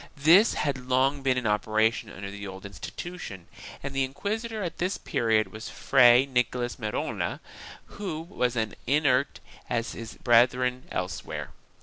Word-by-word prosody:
This 170 +10 +6
had 130 -4 -2
long 135 +2 +2
been 130 -1 +2
in 125 - -2
operation 110 +1 +1
under 100 +1 -7
the 100 0 -7
old 95 0 -9
insti 100 0 -7
tution 175 - -7 0.4
and 140 0 -4
the 135 0 +1
inquisitor 210 - -3
at 170 - -5
this 185 +3 0
period 110 -3 +1
was 110 +2 -7
Fray 125 -1 +5
Nicolas 125 -2 -1
Merola 110 -3 -3 0.5
who 180 -6 -5
was 125 -8 -2
as 110 -2 -1
inert 140 -1 +2 0.3
as 115 -1 -1
his 115 -1 -8
brethren 125 +1 +3
elsewhere. - - -4
125 Hz, 145 wpm, -27 LUFS, 115-145 Hz, 0.5 s, This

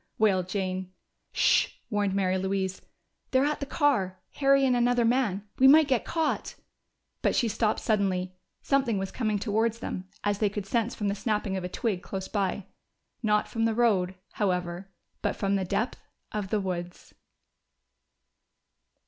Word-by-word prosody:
wailed 190 -4 +2
Jane. 185 -1 -2 0.4
"Sh!" - - +4 0.2
warned 205 -2 0
Mary 190 -1 +1
Louise. 190 0 -2 0.5
"They're 260 +1 +3
at 300 0 0
the 280 - -4
car 220 - +1 0.2
Harry 275 -1 +4
and 255 -2 +3
another 245 0 +3
man. 225 -5 +1
We 265 - +7
might 305 +2 +7
be 255 -3 +3
caught!" 325 +4 -2 0.7
But - - +2
she 240 - +2
stopped 220 0 0
suddenly: 185 -4 0 0.3
something 265 -6 +2
was 195 0 -3
coming 215 -4 0
towards 220 +2 0
them, 185 -4 -5
as 205 -1 0
they 210 - +2
could 205 -1 -5
sense 230 +3 0
from 205 - -2
the 200 - +1
snapping 210 -2 -1
of 190 - -3
a 180 - -3
twig 200 -2 -2
close 190 0 -5
by. 200 -2 -1 0.6
Not 210 -2 +2
from 225 -1 -1
the 225 -1 +1
road, 195 -6 +2 0.2
however, 180 -1 -2 0.3
but - - 0
from 200 -1 0
the 190 -1 0
depth 220 +7 -2 0.3
of 205 -3 -3
the 215 - +1
woods! 175 -2 -5
205 Hz, 160 wpm, -28 LUFS, 190-235 Hz, 0.7 s, We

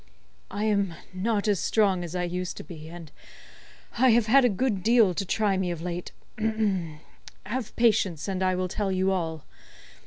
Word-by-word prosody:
"I 205 - -3
am 200 -5 +1 0.2
not 205 +3 -1
as 205 -4 +2
strong 195 -5 +2
as 170 +1 -6
I 180 - -1
used 180 +1 -3
to - - -7
be, 155 0 -10
and 170 -2 -10 0.9
I 260 +1 +6
have 235 -1 +4
had 265 +5 +5
a 245 - +5
good 210 -1 0
deal 225 -2 +4
to 195 - -2
try 200 0 +1
me 185 -1 -1
of 170 -2 -4
late. 175 0 -4 1.3
Have 230 +3 -4
patience 210 -9 +2
and 190 -1 -2
I 185 0 +2
will 185 0 -1
tell 195 +1 -2
you 190 +1 +1
all. 160 -4 -2
190 Hz, 180 wpm, -26 LUFS, 180-215 Hz, 1.3 s, I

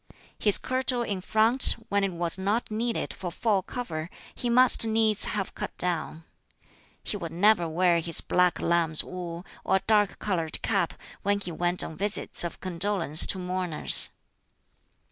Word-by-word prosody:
His 205 -2 +5
kirtle 255 -1 -1
in 200 -5 -4
front, 220 +6 +3
when 200 0 0
it 195 - -1
was 170 -1 -2
not 210 +5 -2
needed 230 +2 -2
for 180 -2 -7
full 200 +2 0
cover, 170 -8 -6 0.2
he 245 - -4
must 250 -1 +7
needs 220 -1 +2
have 200 -3 -3
cut - - -7
down. 165 -2 -1 0.8
He - - -5
would 170 -5 -6
never 175 0 +2
wear 170 +1 +2
his 165 0 -1
(black) 180 -1 +1
lamb's 165 -2 +1
wool, 175 -1 -8 0.2
or - - +1
a 190 - 0
dark 210 -3 +1
colored 170 -6 -2
cap, - - -1 0.3
when 200 +1 0
he 180 -3 -6
went 175 +2 -1
on 160 - -8
visits 205 -2 -2
of 170 - -6
condolence 180 -3 +2
to - - -1
mourners. 180 -3 0
185 Hz, 160 wpm, -26 LUFS, 170-215 Hz, 0.8 s, must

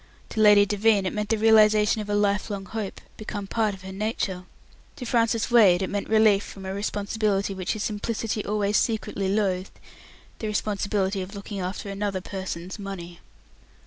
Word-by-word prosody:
To - - -4
Lady 205 -1 +7
Devine 205 0 +2
it 185 - -1
meant 210 0 -3
the 225 - +2
realization 215 -1 +5
of 210 - -7
a 205 - +1
lifelong 205 -1 0
hope, 210 -1 -5 0.2
become 205 -2 -5
part 215 0 0
of 190 - -15
her 190 - -7
nature. 190 -2 -3 0.5
To 250 - -7
Francis 230 -1 +1
Wade 195 -6 +6
it - - -3
meant 205 0 -3
relief 215 -2 +4
from 195 -1 -10
a 190 - -3
responsibility 200 0 -1
which 185 -2 -2
his 215 -2 -4
simplicity 215 0 -2
always 210 0 +1
secretly 210 -3 -1
loathed, 190 -2 -1 0.6
the 220 - -3
responsibility 205 -2 -1
of 190 +3 -7
looking 200 0 -6
after 185 +2 -4
another 200 -1 -2
person's 190 0 -6
money. 175 -3 -7
205 Hz, 170 wpm, -25 LUFS, 195-215 Hz, 0.6 s, Lady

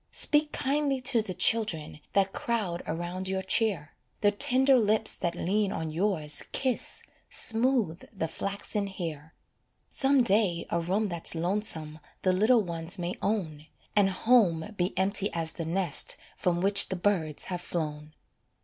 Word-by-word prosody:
Speak 300 0 +1
kindly 280 -1 0
to 250 -3 +2
the 190 -4 -6
children 175 -11 +2
That 195 0 +2
crowd 220 -11 -2
around 175 +3 -4
your 190 0 -2
chair, 190 -6 +1 0.3
The 205 - +4
tender 260 +6 +3
lips 220 0 0
that 170 0 -2
lean 195 +3 0
on 160 -1 -4
yours 160 -4 +1
Kiss, 260 -3 0 0.3
smooth 225 -7 +1
the 190 -7 -3
flaxen 200 +4 -3
hair; 160 -5 -7 0.6
Some 270 -1 +2
day 195 -6 +1
a 170 - +1
room 195 +6 0
that's 170 -1 -1
lonesome 165 -3 -1 0.2
The 185 - +3
little 220 +4 +4
ones 170 +1 -3
may 175 0 -3
own, 165 -8 -2 0.3
And 200 -2 +4
home 195 -3 +2
be 180 0 -2
empty 195 +2 +1
as 165 -1 0
the 165 - -5
nest 170 -2 +1 0.2
From 175 -1 -1
which 200 +1 +4
the 190 - -2
birds 175 -5 0
have 180 -1 -4
flown. 150 -3 -5
190 Hz, 150 wpm, -28 LUFS, 170-215 Hz, 0.6 s, The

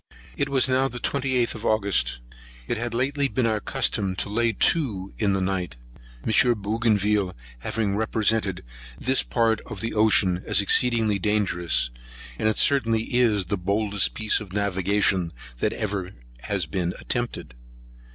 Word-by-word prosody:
It 140 - -1
was 135 -1 +3
now 130 +1 +2
the 125 -2 -6
28th 130 -2 0
of 110 - -9
August. 95 - 0 0.5
It - - -1
had 120 0 -4
lately 140 +3 0
been 130 -2 -1
our 110 -2 +1
custom 95 -2 -1
to 90 +3 -3
lay 115 +2 +1
to 105 - +1
in 100 -3 +2
the 95 - 0
night, 95 -8 -2 0.5
M. - - +1 0.3
Bougainville 105 -2 0 0.2
having 100 - -2
represented 110 -3 0 0.4
this 130 +2 +3
part 115 -2 0
of 110 - -7
the 115 +3 -3
ocean 100 -4 +3
as - - +3
exceedingly 110 0 +2
dangerous; 90 -11 0 0.5
and 110 - +2
it 110 - -1
certainly 115 -6 +2
is 110 -6 +3
the 95 +3 -2
boldest 100 +1 +1
piece 110 0 +2
of 95 -3 -10
navigation 100 -2 0 0.3
that 105 - +1
has - - -7
ever 95 -3 -3 0.4
yet 90 -7 -1
been 90 -1 -2
attempted. 120 - -3
105 Hz, 150 wpm, -24 LUFS, 95-115 Hz, 0.5 s, was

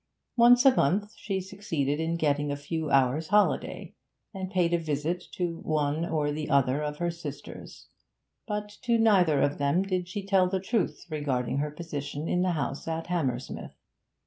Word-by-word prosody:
Once 245 +2 +6
a 270 - +8
month 205 +9 +1
she 195 -2 -3
succeeded 170 -7 -2
in 165 +1 0
getting 145 -2 +1
a - - -1
few 155 +2 -3
hours' 135 +3 +2
holiday, 210 +1 +1 0.4
and 190 -2 -5
paid 180 -3 +1
a 170 - +3
visit 160 +3 -2
to 170 -2 -3
one 155 0 0
or 155 -3 0
the 150 0 -4
other 140 +1 +3
of 150 0 -3
her 175 +1 -1
sisters; 155 -4 -9 0.6
but 210 -1 -2
to 235 -1 +2
neither 185 -10 +4
of 145 +1 0
them 145 +6 +2
did 185 -2 -2
she 195 +2 -5
tell 190 -2 +3
the 190 0 0
truth 210 +3 -1
regarding 135 -3 -1
her 150 +1 -1
position 145 -1 -5
in 180 - +1
the 180 -1 +1
house 145 -2 -3
at 165 0 -2
Hammersmith. 140 -8 -3
165 Hz, 170 wpm, -28 LUFS, 145-190 Hz, 0.6 s, a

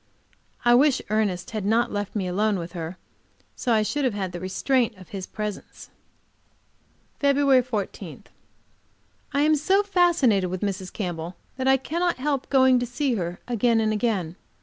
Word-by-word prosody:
I 240 - +6
wish 270 +2 +4
Ernest 205 -5 0
had 215 -2 -3
not 225 +4 +2
left 205 0 -4
me 200 -3 -1
alone 200 +3 +1
with 170 -1 -6
her, 170 0 -6 0.6
so 255 - -4
that 230 - +5
I 215 - +2
should 290 +7 -1
have 250 -6 0
had 190 -3 -3
the 175 - -6
restraint 225 +5 0
of 185 -2 -14
his 190 -2 -6
presence. 210 -2 -7 1.3
FEB. 280 -2 +4
14. 220 -6 -5 1.1
I 280 0 +1
am 305 +1 +4
so 380 +7 +2
fascinated 340 - +3
with 185 0 -4
Mrs. 190 -2 -3
Campbell 175 -3 -4 0.2
that 260 0 -1
I 265 0 +5
cannot 340 +6 -1
help 275 0 -2
going 260 -2 +5
to 245 - -2
see 250 +2 -1
her 175 -4 -3
again 235 -1 +2
and 215 -1 +1
again. 200 -7 -1
220 Hz, 170 wpm, -25 LUFS, 190-265 Hz, 1.3 s, I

